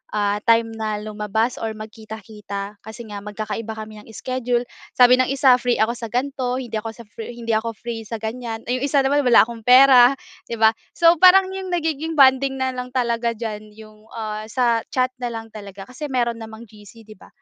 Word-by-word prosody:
ah, 205 0 +1
time 230 0 +3
na 215 -1 -3
lumabas 215 +2 -2
or 225 -1 -3
magkita-kita, 215 -2 -8
kasi 220 +2 -10
nga 205 -1 -6
magkakaiba 215 +1 -5
kami 215 -1 -9
ng 210 - -16
schedule. 245 0 -2 0.3
Sabi 250 0 +6
ng 255 - +3
isa, 265 -1 +4
"Free 245 0 0
ako 220 +2 +1
sa 230 - -6
gan'to. 255 +1 -2
Hindi 230 -3 -5
ako 225 +1 -7
sa 235 - -12
free 225 +3 -9
hindi 230 -1 -4
ako 225 +1 -1
free 225 0 -7
sa 230 - -5
ganyan." 225 0 -5
Eh, 250 +2 -2
'yong 280 - -1
isa 280 -1 +2
naman, 285 +1 +1
"Wala 235 - +7
akong 230 -1 -9
pera." 255 0 +7 0.3
'Di 235 - -4
ba? 220 0 +7 0.2
So 335 0 +5
parang 375 +1 +6
'yong 380 0 -6
nagiging 320 -1 -2
bonding 270 -1 +4
na 260 0 -1
lang 250 0 -7
talaga 235 -1 0
diyan, 215 -2 -7
'yong, 215 0 -16
ah, 215 -1 -5
sa 235 -1 0
chat 255 -1 0
na 245 - -3
lang 225 0 -7
talaga 200 -2 -10
kasi 290 +4 -6
meron 240 -3 -1
namang 220 0 -10
GC, 215 +1 -16
'di 215 -1 -15
ba? - - -16
230 Hz, 205 wpm, -21 LUFS, 220-255 Hz, 0.3 s, Wala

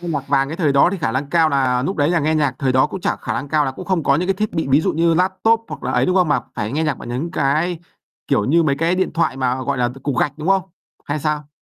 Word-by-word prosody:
nghe 175 - -6
nhạc 145 -4 -3
Vàng 135 -1 +2
cái 160 - -5
thời 155 -6 +1
đó 140 +3 +5
thì 195 - -3
khả 115 -7 -1
lăng 140 +2 -3
cao 165 -1 +3
nà 130 -3 +1
núc 195 - -3
đấy 145 0 +2
là 170 -3 +2
nghe 155 +2 +1
nhạc 150 -2 +1
thời 130 -2 0
đó 130 +2 +4
cũng 190 - -7
chả - - -1
khả - - -5
năng 140 - -4
cao 150 -1 +2
là 135 - -1
cũng 180 - -9
không 180 -2 0
có 140 -1 +3
những 180 +4 -1
cái 195 - +2
thiết 215 +2 -2
bị, 160 -4 -2
ví 140 - +5
dụ - - 0
như 165 +1 +2
laptop 190 +6 +2
hoặc - - -8
là - - -2
ấy, - - +2
đúng 185 - +1
không? 180 -4 +3
Mà 140 -4 +2
phải 105 +2 -3
nghe 155 +3 0
nhạc 150 - -1
bằng - - -9
những 130 +8 -3
cái, 160 +5 0 0.5
kiểu 105 - +1
như, 165 +8 +3
mấy 140 -3 +1
cái 165 +3 +1
điện 185 0 -1
thoại 165 -5 0
mà, 130 0 -1
gọi 140 0 -2
là, 120 - +1
cục 130 +2 -11
cục 140 -3 -2
gạch, 145 +1 0
đúng 155 +4 -4
không? 195 -1 +3 0.4
Hay 145 +1 -2
sao? 150 -1 -2
150 Hz, 325 wpm, -19 LUFS, 135-170 Hz, 0.5 s, đó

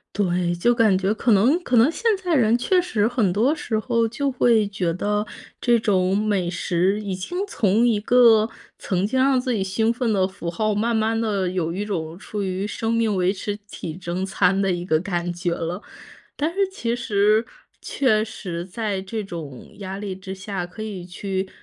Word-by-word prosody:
对， 180 -3 +1
就 240 +8 +3
感 220 -5 +4
觉 195 +2 +1
可 230 +2 0
能 235 - +4
可 245 - +1
能 230 +5 +6
现 335 - -9
在 365 -2 -2
人 235 -3 +4
确 365 +9 +2
实 220 - 0
很 230 -6 +1
多 225 +10 +2
时 235 -8 -2
候 230 +1 +1
就 275 +5 -2
会 235 -4 +3
觉 190 -4 -1
得， 205 +4 -1 0.4
这 240 -1 +4
种 190 -3 +2
美 205 -4 0
食 180 +3 0
已 200 -2 -3
经 185 - -5
从 225 - +2
一 220 -3 +2
个 225 -1 +5 0.3
曾 185 0 -1
经 260 +5 0
让 265 0 +4
自 250 0 -1
己 205 -4 0
兴 220 +4 +1
奋 240 -1 -1
的 190 -3 +2
符 190 -3 -6
号， 215 +5 0
慢 225 +3 0
慢 220 +1 +1
地 200 -4 0
有 175 -3 -1
一 195 +4 -3
种 165 -5 -4
出 210 +1 -5
于 190 0 -2
生 225 +2 -2
命 230 -2 +1
维 185 0 +2
持 205 +1 -4
体 160 -5 -6
征 180 +1 -3
餐 190 0 +2
的 195 -1 +2
一 175 -1 -2
个 160 -3 +2
感 175 -1 -2
觉 175 0 -2
了。 170 +3 -4 0.5
但 300 +2 0
是 395 +2 +1
其 235 -11 -2
实 215 -1 +2 0.3
确 220 -6 +1
实， 180 -6 -6
在 200 +1 -3
这 210 +3 -4
种 160 -9 -8
压 195 -1 -6
力 200 -2 -4
之 190 0 -7
下， 190 -1 -4
可 180 +5 -10
以 200 -5 -5
去 190 +1 -4
205 Hz, 215 characters per minute, -23 LUFS, 185-230 Hz, 0.5 s, 能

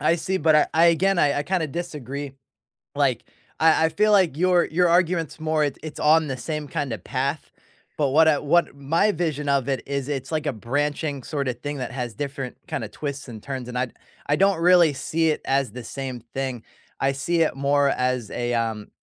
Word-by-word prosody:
I 165 - +3
see, 190 +3 -2
but 155 -1 +3
I 150 - +4
I 165 +1 +5
again, 180 +3 +3
I 145 -3 +3
I 145 - 0
kinda 180 0 -1
disagree. 145 -3 -5 0.6
Like, - - +1 0.3
I 160 0 +4
I - - +1
feel 210 +7 +2
like 185 -8 +4
your 180 +1 +3
your 175 +2 +2
argument's 170 -2 +1
more 155 -1 +1
it 145 - -3
it's 155 -2 -7
on 155 +1 +4
the 135 - -3
same 150 +2 -4
kinda 145 -9 -3
path, 140 +3 -3 0.5
but 145 -3 +2
what 160 +3 +5
I 150 -2 +4
what 170 +3 +2
my 165 +9 +2
vision 155 -4 -2
of 140 -2 +1
it 135 -1 -1
is, 140 -1 -3
it's 135 -2 -4
like 155 -1 -1
a 145 - +1
branching 140 +5 -2
sort 140 -3 -2
of 125 -1 -4
thing 145 +1 -4
that 125 -1 -4
has 125 -3 -4
different 140 -3 -5
kind - - -3
of 105 - -8
twists 140 -2 -5
and 110 -3 -9
turns, 130 -3 -5
and 125 - -6
I 125 0 0 0.4
I 145 - +3
don't 195 -1 +3
really 175 -2 +6
see 160 +4 0
it 150 - -1
as 135 -4 0
the 125 -1 -8
same 130 -3 -5
thing. 130 -3 -3 0.4
I 135 0 +2
see 165 +5 -1
it 155 - 0
more 140 +1 +2
as 125 -4 -1
a, 120 0 -2
um, 115 -3 -2
145 Hz, 215 wpm, -24 LUFS, 135-160 Hz, 0.6 s, really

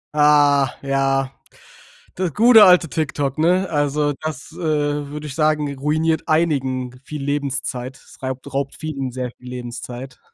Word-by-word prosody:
Ah, 145 -2 +5
ja. 135 -1 0 0.8
Das 180 -4 -2
gute 225 -1 +8
alte 180 -3 +6
TikTok, 145 -3 -2
ne? 180 +4 +2
Also, 145 0 0
das, 155 -1 -6
äh, - - -14
würde 150 -2 -2
ich 140 - -7
sagen, 150 -3 +1
ruiniert 155 +3 0
einigen 130 -6 0
viel 150 0 -7
Lebenszeit. 135 -2 -3
Es - - -19
reibt 130 +1 -5
raubt 140 0 -2
vielen 140 -5 -4
sehr 125 -1 -5
viel 125 - -14
Lebenszeit. 125 +1 -7
145 Hz, 140 wpm, -20 LUFS, 135-155 Hz, 0.8 s, gute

